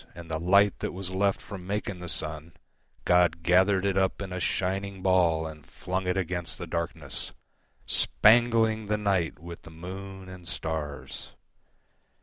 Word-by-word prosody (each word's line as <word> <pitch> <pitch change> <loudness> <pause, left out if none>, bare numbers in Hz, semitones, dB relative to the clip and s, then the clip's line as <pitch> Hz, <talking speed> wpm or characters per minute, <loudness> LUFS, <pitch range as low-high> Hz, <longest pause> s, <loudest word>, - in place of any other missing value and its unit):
And 85 -1 -9
the 80 - -1
light 100 +4 +4
that - - -3
was 95 0 -5
left 100 +1 +1
from 95 -3 -9
making 100 -2 -2
the 90 - -7
sunGod 85 +2 -1
gathered 95 +2 +4
it 100 -1 +1
up 95 -1 +1
in 95 -2 -5
a 90 - -3
shining 95 +2 -1
ballAnd 80 -5 +2
flung 95 0 -3
it 90 +1 +1
against 90 -2 -2
the 90 - -5
darkness, 80 -4 -4 0.5
Spangling 110 -1 +4
the 105 +1 +1
night 95 -5 0
with 85 +2 -9
the - - -13
moon 95 +3 -8
and 90 -2 -10
stars. 80 -5 -5
90 Hz, 145 wpm, -28 LUFS, 85-95 Hz, 0.5 s, light